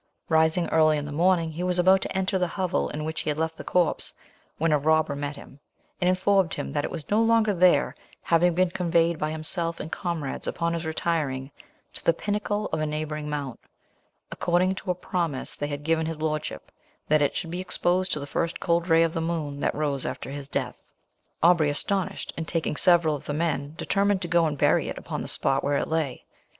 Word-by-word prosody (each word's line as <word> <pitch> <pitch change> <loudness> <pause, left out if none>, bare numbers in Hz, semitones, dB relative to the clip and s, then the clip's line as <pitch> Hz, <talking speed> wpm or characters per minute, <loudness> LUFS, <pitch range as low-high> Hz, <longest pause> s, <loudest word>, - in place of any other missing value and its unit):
Rising 160 +1 +3
early 155 -1 +4
in 145 - -3
the 145 - -6
morning, 165 +1 +2
he 160 +3 -6
was 180 0 +1
about 190 +2 +5
to - - -3
enter 190 0 0
the 180 - +1
hovel 185 +1 -1
in 150 +1 -4
which 160 0 -3
he - - -3
had 150 - -1
left 160 0 -1
the - - -8
corpse, 175 -3 0 0.4
when 165 +1 +1
a 150 - +4
robber 155 0 +2
met 145 +1 -4
him, 140 0 -13 0.4
and 180 - +3
informed 190 -1 +2
him - - -5
that 145 -1 0
it - - -2
was 160 -1 -7
no 215 +2 +4
longer 225 -2 +3
there, 180 -1 +4 0.3
having 170 0 +3
been 185 0 +2
conveyed 170 -2 +1
by 155 - -1
himself 165 +2 -3
and 160 - -6
comrades, 165 -6 -3
upon 170 0 -1
his 165 -1 -3
retiring, 150 -5 -1 0.4
to - - -6
the 170 - +4
pinnacle 210 +1 -2
of 160 - +1
a 155 - 0
neighbouring 150 0 -3
mount, 145 -4 -4 0.7
according 180 +2 +1
to 190 0 -7
a 180 - +2
promise 170 -6 -3
they 145 - -3
had 145 0 -5
given 160 +1 +1
his 160 -1 -4
lordship, 155 -1 -3 0.4
that 155 0 +3
it 145 - +1
should 165 - -3
be 180 +1 -3
exposed 185 0 0
to - - 0
the 140 - -5
first 165 +3 -2
cold 170 -1 +1
ray 165 -1 +5
of 165 -1 0
the 165 - -2
moon 160 -4 -3
that - - 0
rose 145 -3 -1
after - - -5
his 140 -1 -7
death. - - -4 0.5
Aubrey 170 -3 +5
astonished, 190 +5 -2
and 165 -1 -4
taking 165 -3 -1
several 170 -2 +4
of 140 - -9
the 145 - -3
men, 155 -2 -1
determined 200 -1 +1
to - - -2
go 170 -1 +3
and 150 -2 -3
bury - - +3
it - - -5
upon - - -5
the - - -5
spot 135 - 0
where 145 0 +1
it - - -1
lay. 160 -5 -2
165 Hz, 220 wpm, -26 LUFS, 150-180 Hz, 0.7 s, about